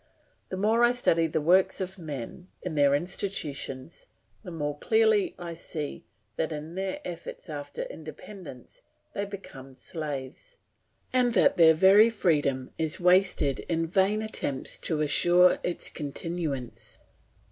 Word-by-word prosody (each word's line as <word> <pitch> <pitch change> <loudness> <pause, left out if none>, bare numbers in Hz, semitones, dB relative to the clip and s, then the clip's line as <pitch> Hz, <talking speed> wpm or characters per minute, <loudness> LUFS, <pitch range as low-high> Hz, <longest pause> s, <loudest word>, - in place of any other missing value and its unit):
The 185 - -4
more 220 +4 +3
I 240 +1 +5
study 165 -9 +2
the 155 - -1
works 180 +5 +3
of 190 0 -4
men 155 +2 -7 0.2
in 180 - -4
their 140 -2 +4
institutions, 160 -5 -3 0.3
the - - -9
more 150 -4 -3
clearly 440 -4 +3
I 170 -1 -6
see 155 -3 -6 0.3
that, 160 - -1
in 155 +2 -6
their 190 +1 -3
efforts 170 0 -7
after 145 - -5
independence, 210 - -10 0.3
they 200 - -2
become 135 -10 -10
slaves, 150 - -6 0.6
and 250 -2 +3
that - - +4
their 160 -2 +7
very 195 +6 +7
freedom 145 - 0
is 160 -2 -1
wasted 180 -6 +3
in 165 -1 +1
vain 195 +5 +1
attempts 145 -11 -3
to 155 -3 -1
assure 175 +5 +5
its 175 - -2
continuance. 150 -3 -4
170 Hz, 135 wpm, -28 LUFS, 150-195 Hz, 0.6 s, their